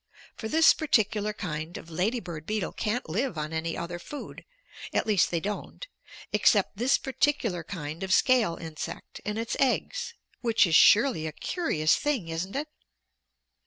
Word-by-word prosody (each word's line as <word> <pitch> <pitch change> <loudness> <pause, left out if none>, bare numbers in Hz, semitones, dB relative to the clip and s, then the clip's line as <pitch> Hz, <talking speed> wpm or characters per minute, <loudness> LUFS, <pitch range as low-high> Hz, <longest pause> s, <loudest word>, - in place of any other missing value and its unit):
For 220 - -5
this 320 +7 +6
particular 215 -7 +1
kind 160 -5 -5
of 170 - -11
lady 200 +9 0
bird 170 -5 -8
beetle 215 -5 -1
can't 230 +3 -2
live 200 +4 -2
on 155 +1 -3
any 165 +1 -2
other 175 +1 -5
food 290 +11 -8 0.5
at - - +2
least 210 -5 +3
they 170 - 0
don't 210 - -5 0.5
except - - +3
this 245 +5 +3
particular 255 - 0
kind 160 -3 -6
of 190 -1 -3
scale 230 -5 +4
insect 160 -2 -7
and 210 +1 -3
its 230 +1 -2
eggs, 470 - 0 0.2
which 230 -3 +3
is 165 -3 +2
surely 210 - +5
a - - -4
curious 155 - 0
thing, 270 - -1
isn't 170 +6 -4
it?" 295 +2 -2
205 Hz, 160 wpm, -27 LUFS, 165-245 Hz, 0.5 s, this